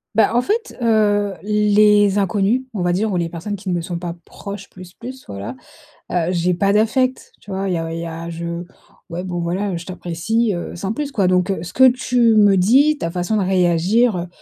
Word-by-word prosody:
Bah, 225 - +4
en 245 - +4
fait, 450 - -2
heu, 205 -3 +2
les 210 -1 +3
inconnus, 205 +5 +1
on 195 - -3
va 175 0 +1
dire, 210 +5 0
ou - - -1
les 170 -1 -1
personnes 180 +5 -5
qui 195 0 -7
ne 180 - 0
me 175 - 0
sont 175 +1 -5
pas 170 -1 -5
proches 200 -1 -9
plus, 185 -1 -13
plus 260 +2 -9
voilà, 100 +5 -6 0.6
heu, 175 0 0
j'ai 180 0 +1
pas 200 +3 +1
d'affect, 255 +5 +1
tu 200 - -11
vois? 195 +1 -2
Il 180 - 0
y - - 0
a 165 0 -4
il 165 - -4
y 170 - -4
a 165 +1 -6
je 170 +1 -5 0.5
ouais, 175 +2 -5
bon, 175 -2 -4
voilà, 190 +4 -2
heu, - - -2
je 170 - -8
t'apprécie, 190 +5 -1
heu, 175 - -6
sans 190 +4 -3
plus 290 +1 -4
quoi, 195 -4 +2
donc 185 +1 +2
ce 175 +1 -7
que 260 0 +7
tu 245 -2 +2
me 205 -2 +5
dis, 275 +11 +4
ta 165 - -3
façon 180 +4 -1
de 200 - +1
réagir, 185 +4 +2
heu, 175 +1 -4
195 Hz, 230 wpm, -19 LUFS, 175-215 Hz, 0.6 s, que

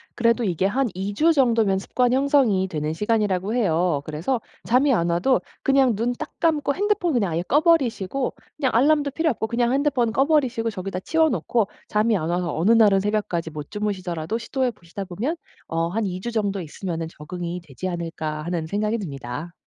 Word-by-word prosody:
그래도 235 0 +2
이게 185 -3 0
한 255 +7 +1
2 195 +2 -3
주 325 +10 +4
정도면 230 -8 +3
습관 245 +5 +1
형성이 260 -8 +3
되는 155 -3 -3
시간이라고 210 0 0
해요. 175 - +1
그래서 170 - -2 0.2
잠이 260 +4 +3
안 170 -8 +2
와도 180 +10 +2 0.2
그냥 270 -4 +3
눈 235 +4 0
딱 300 +5 -7
감고 300 -4 +2
핸드폰 400 -3 0
그냥 205 -8 +1
아예 170 +2 -1
꺼 285 +10 +2
버리시고 270 - +1 0.2
그냥 275 -4 +1
알람도 285 +4 +3
필요 320 +3 +1
없고 225 -4 -1
그냥 235 +1 0
핸드폰 270 -4 +1
꺼 265 +4 +2
버리시고 255 -7 +1
저기다 190 -2 -4
치워 320 +8 +2
놓고 210 - 0 0.2
잠이 215 +1 +2
안 160 -2 -3
와서 175 -1 -1
어느 180 +8 +3
날은 215 -4 +6
새벽까지 195 -5 -1
못 150 -1 -7
주무시더라도 195 -2 -3
시도해 255 +2 -1
보시다 175 -1 -8
보면 205 - -3 0.3
어 165 0 -1
'한 215 +4 -1
2 180 -1 -4
주 235 - -4
정도 205 -3 -1
있으면은 165 0 -4
적응이 170 +3 -6
되지 165 +2 -7
않을까?' 165 -3 -4
하는 170 -2 -2
생각이 210 +6 -1
듭니다. 145 - -6
210 Hz, 395 characters per minute, -23 LUFS, 175-255 Hz, 0.3 s, 날은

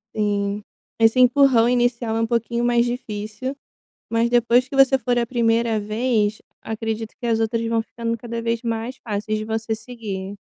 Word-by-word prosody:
Sim, 205 -1 -1 0.3
esse 225 +2 +4
empurrão 250 -2 +5
inicial 240 -2 +1
é - - +1
um - - +2
pouquinho 235 0 -1
mais 240 0 +3
difícil. 230 +1 -4 0.6
Mas, 230 +1 +1
depois 240 +1 +3
que 275 - -5
você 270 0 +6
for 245 0 0
a 235 - +1
1° 230 -2 +1
vez, 215 0 0 0.2
acredito 225 0 -4
que 240 - -5
as 225 -1 +1
outras 230 +1 0
vão 225 0 +1
ficando 230 0 -4
cada 235 0 -5
vez 230 0 -1
mais 230 +2 -3
fáceis 215 0 -2
de 215 - -4
você 220 0 -2
seguir. 215 -4 -6
230 Hz, 170 wpm, -22 LUFS, 220-240 Hz, 0.6 s, você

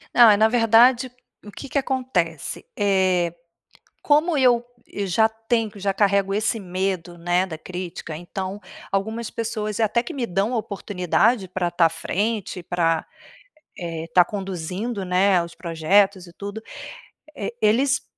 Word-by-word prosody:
Ah, 230 -4 +8
na 215 +2 +4
verdade, 240 +2 +4 0.3
o 210 - -9
que 275 - -9
que 280 - -1
acontece? 250 - -2
Eh, 185 -4 +2 0.7
como 305 +2 +3
eu 245 -3 +4 0.3
eu 200 - -3
já 220 +4 +3
tenho 225 0 -1
já 195 -1 -1
carrego 195 -1 +2
esse 215 +1 0
medo, 185 -2 -3
né, 175 +2 +1
da 160 -4 -7
crítica, 175 -2 -7
então 190 +4 -6 0.3
algumas 220 +4 -2
pessoas 215 -2 -3
até 220 +2 +2
que 235 - -7
me 260 -4 -2
dão 200 +5 -1
oportunidade 200 0 0
pra 180 -1 -1
tá 170 -1 +4
a - - -5
frente, 205 +1 -3
pra 165 -2 0 0.7
eh, 165 -3 -5
tá 180 - +7
conduzindo, 195 +2 -4
né, 185 +1 +3
a 170 - +2
os 170 - -9
projetos 185 +3 +1
e 175 - -15
tudo. 205 +3 -7 0.7
E 210 +3 -5
eles, 265 +7 +3
200 Hz, 145 wpm, -23 LUFS, 180-225 Hz, 0.7 s, Ah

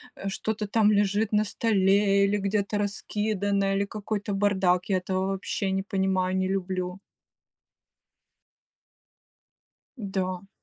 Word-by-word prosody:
э, 195 - -4
что-то 210 +1 -3
там 215 0 +3
лежит 205 +1 +1
на 210 0 +3
столе 200 -2 +3
или 205 +1 +1
где-то 200 +1 -1
раскидано, 205 -1 -1
или 200 +1 +1
какой-то 205 -1 -4
бардак, 190 -3 +2
я 190 - +3
этого 185 +1 -1
вообще 195 0 -2
не 195 0 0
понимаю, 190 -2 0
не 185 - +1
люблю. 185 -1 -2 3.0
Да. 190 -3 -3
195 Hz, 115 wpm, -26 LUFS, 190-205 Hz, 3.0 s, там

